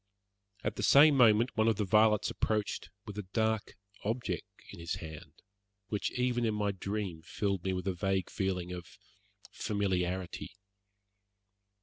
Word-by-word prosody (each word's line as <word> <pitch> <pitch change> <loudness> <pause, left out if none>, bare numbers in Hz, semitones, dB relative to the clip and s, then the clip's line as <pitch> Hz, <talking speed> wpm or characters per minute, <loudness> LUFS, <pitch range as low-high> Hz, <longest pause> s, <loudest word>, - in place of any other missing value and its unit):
At - - -2
the - - -2
same 145 +1 +7
moment 120 -1 +5
one 110 0 +3
of 115 - +4
the 105 +1 -1
varlets 105 +1 +4
approached 105 -1 -1 0.2
with 105 -1 -6
a 95 -3 -7
dark 110 -1 0 0.3
object 110 -5 -2 0.2
in - - -10
his 85 0 -3
hand, 80 -2 -10 0.5
which 105 - -1
even 125 -1 +1
in 110 -2 +1
my 105 -1 0
dream 95 -3 -4
filled 100 +1 -2
me 95 - 0
with 90 0 -3
a 95 - 0
vague 95 +1 -1
feeling 90 -2 -2
of 90 -2 -8 0.5
familiarity. 95 -2 -2
100 Hz, 145 wpm, -32 LUFS, 90-110 Hz, 0.5 s, same